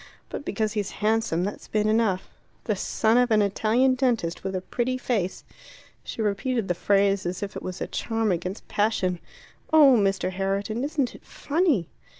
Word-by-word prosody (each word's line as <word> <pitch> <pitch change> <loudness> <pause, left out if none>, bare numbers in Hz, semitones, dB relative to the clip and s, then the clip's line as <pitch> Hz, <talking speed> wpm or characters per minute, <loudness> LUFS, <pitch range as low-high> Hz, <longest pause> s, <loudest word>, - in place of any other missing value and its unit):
But - - -5
because 215 -3 -1
he's 205 -3 -2 0.2
handsome, 220 -6 +1
that's 205 +2 -5
been 215 0 0
enough. 215 -4 +1 0.4
The 215 - 0
son 220 +4 +2
of 250 0 +3
an 215 -2 +4
Italian 225 +6 +2
dentist, 240 -10 0
with 190 0 -3
a 185 - -2
pretty 250 +6 -2
face." 215 -8 -2 0.6
She 225 - -4
repeated 215 +2 -1
the 175 - +1
phrase 195 +2 +2
as 180 +3 -3
if 200 - -5
it - - -5
was 185 0 -6
a - - 0
charm 225 -2 -1
against 180 +3 -4
passion. 195 -4 0 0.5
"Oh, 295 -5 +7
Mr. 195 -3 +1
Herriton, 195 +5 -2
isn't 285 -3 -1
it - - -14
funny!" 290 - 0
215 Hz, 170 wpm, -25 LUFS, 195-240 Hz, 0.6 s, Oh